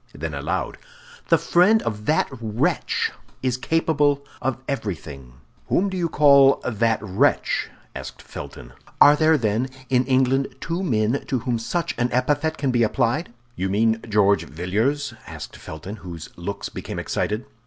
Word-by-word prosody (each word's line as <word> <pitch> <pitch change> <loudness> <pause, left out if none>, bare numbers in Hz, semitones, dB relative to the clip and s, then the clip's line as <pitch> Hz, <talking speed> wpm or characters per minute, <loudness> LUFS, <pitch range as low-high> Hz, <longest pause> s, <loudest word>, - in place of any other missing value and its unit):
Then - - -4
aloud, - - -3 0.5
"The - - +6
friend 200 +6 +4
of 105 -1 -4
that 155 - +3
wretch 110 +1 0 0.3
is 130 -2 +1
capable 145 0 +1 0.2
of 130 -2 -1
everything." 75 - -5 0.3
"Whom 195 +3 +2
do 190 - -5
you 175 -2 0
call 140 -2 +6
that 115 -1 +1
wretch?" 95 -3 +1 0.3
asked - - -7
Felton. - - -9 0.3
"Are 145 +1 +8
there, 155 +1 +4
then, 115 +1 0 0.2
in 125 -1 +3
England 135 +1 +2
two 170 +2 -3
men 115 - +1
to 130 - 0
whom 120 -2 -1
such 170 +9 -2
an 120 +1 +1
epithet 145 +5 +1
can 140 -3 0
be 120 -1 +2
applied?" 120 +7 +1 0.2
"You 95 +1 -2
mean 110 +3 +2
George 100 -1 +3
Villiers?" 110 - -1
asked - - -8
Felton, 90 +7 -8
whose 85 -5 -8
looks 95 +4 -5
became - - -6
excited. 105 +3 -2
125 Hz, 150 wpm, -23 LUFS, 105-145 Hz, 0.5 s, Are